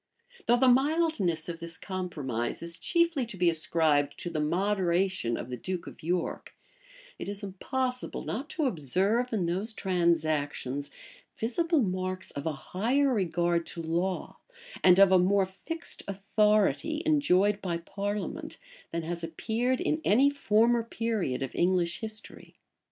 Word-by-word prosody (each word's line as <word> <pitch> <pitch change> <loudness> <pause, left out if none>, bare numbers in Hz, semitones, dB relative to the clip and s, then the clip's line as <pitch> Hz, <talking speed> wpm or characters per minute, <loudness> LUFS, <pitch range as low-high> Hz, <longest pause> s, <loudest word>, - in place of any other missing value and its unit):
Though 240 +1 +5
the 260 +1 +4
mildness 260 - +2
of 170 -1 -5
this 170 0 -7
compromise 150 - -3
is 170 0 -1
chiefly 335 -5 +2
to 210 - -7
be 175 -1 +4
ascribed 155 -3 +1
to 175 - -4
the 155 - -2
moderation 180 - +1
of 125 - -6
the 125 - -3
duke 185 +6 -4
of - - -11
York, 175 +1 -2 0.6
it - - -5
is 200 +1 -5
impossible 250 +6 -3
not 275 +8 -4
to 315 - -1
observe 200 - +1
in 205 -6 0
those 190 +7 -1
transactions 155 -7 0 0.5
visible 315 +6 +1
marks 185 -1 -3
of 140 +3 -5
a - - +1 0.2
higher 255 +8 +2
regard 175 -4 0
to 170 - -5
law, 175 +3 -2 0.4
and 180 -1 +7
of 195 -1 +7
a 185 - +6
more 195 +2 +3
fixed 325 - -5
authority 210 - +1
enjoyed 210 - +3
by 175 -3 -1
parliament, 200 +4 -4 0.3
than 170 0 -3
has 170 +1 -4
appeared 230 +10 -1
in 310 - 0
any 270 +7 +4
former 235 -3 +3
period 225 - -2
of 135 - -5
English 175 -1 +1
history. 220 -1 -7
190 Hz, 145 wpm, -29 LUFS, 170-230 Hz, 0.6 s, and